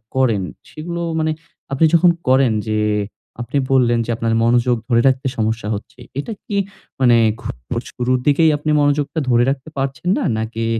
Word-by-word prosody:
করেন, 120 -6 +2 0.3
সেগুলো 170 +2 -6 0.2
মানে 155 0 +1 0.4
আপনি 140 +4 +3
যখন 170 +1 +6 0.2
করেন 130 -2 +4
যে 110 0 0 0.6
আপনি 120 +4 -3
বললেন 120 -3 +3
যে, - - -11
আপনার 115 0 -1
মনোযোগ 120 +1 +3
ধরে 115 -1 +4
রাখতে 130 0 +1
সমস্যা 110 -1 -1
হচ্ছে। 105 +4 -10 0.2
এটা 185 +10 -4
কি 205 -5 -3 0.4
মানে 125 -3 +5 0.3
খুব - - -5 0.4
শুরুর 125 +1 0
দিকেই 155 +3 +5
আপনি 150 +1 -2
মনোযোগটা 145 +2 +1
ধরে 120 -1 +4
রাখতে 135 +2 -3
পারছেন 135 +4 -2
না? - - -1
নাকি 110 +1 -3
130 Hz, 160 wpm, -19 LUFS, 120-145 Hz, 0.6 s, যখন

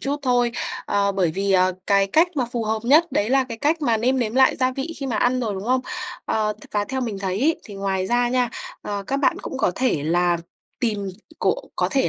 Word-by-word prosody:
chút 280 +1 -1
thôi, 245 -2 +2 0.3
ờ, 200 0 +1
bởi 185 -4 +1
vì, 195 +4 0
ờ, 185 0 +4
cái 195 -1 +4
cách 320 - +4
mà 260 - +2
phù 235 -2 -1
hợp 220 +1 0
nhất 305 +7 +4
đấy 210 +3 +1
là 270 0 +4
cái 230 -3 -7
cách 310 +5 +1
mà 235 -5 +3
nêm 255 +4 +1
nếm 230 -2 -1
lại 265 0 +5
gia 255 0 +2
vị 275 +5 -4
khi 275 - -4
mà 235 - -1
ăn 250 +3 +2
rồi, 220 -4 -2
đúng 190 +1 -5
không? 255 +2 +2 0.4
Ờ, 215 -1 0
t - - -16
và 205 -1 +1
theo 265 +4 -3
mình 225 -6 -3
thấy 195 0 -2
ấy 315 +4 +3
thì 205 - -10
ngoài 195 -1 -1
ra 240 +2 +2
nha, 250 0 +1 0.3
ờ, 205 -1 -3
các 275 - 0
bạn 280 - +2
cũng 265 - -5
có - - +2
thể 250 - +1
là 175 +2 +2 0.4
tìm 210 -5 -1 0.3
cộ - - +2 0.2
có - - +1
thể 270 -2 +2
235 Hz, 250 wpm, -23 LUFS, 200-260 Hz, 0.4 s, lại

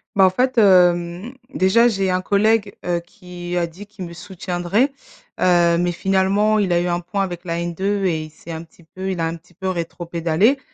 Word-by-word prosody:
Bah, 195 - +5
en - - +4
fait, 250 +6 +1
hem, 180 +1 +3 0.2
déjà 210 +6 +4
j'ai 195 -5 0
un 185 0 0
collègue, 205 +1 +2
heu, 175 -1 0
qui 175 0 -7
a 175 - +1
dit 180 +5 -11
qu'il 205 -3 -8
me 170 - -9
soutiendrait. 185 - -1 0.5
Heu, 175 -2 +4
mais 175 0 +1
finalement 195 +4 +2
il 195 -3 0
a 175 - +3
eu 175 - -1
un 175 0 0
point 180 +3 -2
avec 175 -2 -6
la 170 -1 -2
N2 190 +4 -1
et 165 -4 0
il - - -12
s'est 160 +2 -12
un 160 0 -5
petit 170 +1 -21
peu 190 +4 -6
il 185 -2 -3
a 165 - +1
un 165 +1 -2
petit 170 +1 -18
peu 190 +2 -3
rétropédalé. 170 - 0
180 Hz, 210 wpm, -20 LUFS, 170-200 Hz, 0.5 s, Bah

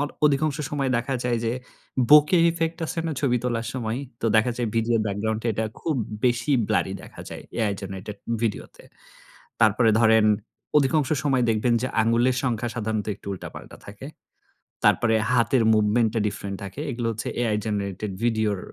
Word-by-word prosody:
Or 145 - 0 0.2
অধিকাংশ 150 +1 +2
সময় 140 -3 -1
দেখা 130 +3 -2
যায়। 120 -1 +1
যে 115 - 0 0.6
বোকে 150 +4 +7
ইফেক্ট 165 0 -2
আছে 165 - -5
না, 160 - -1
ছবি 125 -4 +2
তোলার 120 -2 -1
সময়। 115 -2 -2 0.2
তো - - 0
দেখা 110 +3 +3
যায় 120 - -1
ভিডিওর 115 0 +2
ব্যাকগ্রাউন্ড 110 +2 -2
এ - - +2
এটা 110 +1 -1 0.2
খুব 160 - -1 0.3
বেশি 120 +3 +2 0.2
ব্লারি 95 -3 +1
দেখা - - -12
যায় - - -7 0.2
AI 110 -3 +1
জেনারেটেড 95 +1 -7 0.3
ভিডিওতে। 110 -3 -3 0.8
তারপরে 110 +1 +4
ধরেন 110 -1 +5 0.5
অধিকাংশ 145 0 +3 0.2
সময় 135 -3 +2
দেখবেন। 115 +2 +2
যে - - 0
আঙুলের 120 +3 +2
সংখ্যা 120 -2 -1
সাধারণত 110 -2 -2
একটু 100 - -20
উল্টাপাল্টা 95 - -10
থাকে। - - -9 0.8
তারপরে 110 -2 +4 0.2
হাতের 120 0 +3
মুভমেন্ট 110 +2 +3
টা - - +2
ডিফরেন্ট 100 -1 -5
থাকে। 100 +6 -8
এগুলো 120 -1 -3
হচ্ছে 110 0 -5
AI 115 -3 +1
জেনারেটেড 100 -1 -3
ভিডিওর 110 -4 +1
115 Hz, 165 wpm, -24 LUFS, 110-130 Hz, 0.8 s, বোকে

